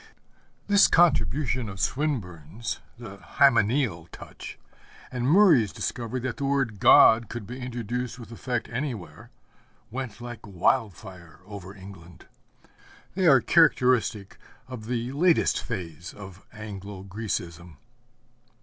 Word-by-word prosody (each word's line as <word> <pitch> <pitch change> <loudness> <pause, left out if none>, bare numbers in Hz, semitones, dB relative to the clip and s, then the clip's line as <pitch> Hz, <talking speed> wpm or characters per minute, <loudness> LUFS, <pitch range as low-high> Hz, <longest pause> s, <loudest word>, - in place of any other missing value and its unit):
This 200 -1 +5
contribution 140 -8 +2
of 95 -1 -9
Swinburne's, 95 - -3 0.2
the 110 -4 -10
hymeneal 110 - +2
touch, - - -10 0.5
and 125 -1 -2
Murray's 155 - +5
discovery 120 +1 -4
that 125 -1 -4
the 140 - -3
word 135 -7 -1
God 115 +3 +6
could 120 -2 -6
be 125 +5 -8
introduced 125 0 -4
with 115 -2 -11
effect 120 0 -4
anywhere, 115 - -6 0.6
went 125 -3 -6
like 120 -1 -8
wildfire 95 - -2
over 100 -1 -10
England. 95 -3 -13 0.9
They 185 -1 +1
are 135 -5 +6
characteristic 125 - +2 0.3
of 120 -4 -9
the 120 0 -3
latest 165 +4 +2
phase 85 - -7
of 95 -1 -12
Anglo 100 -3 -9
Grecism. 90 -5 -6
115 Hz, 115 wpm, -26 LUFS, 95-130 Hz, 0.9 s, God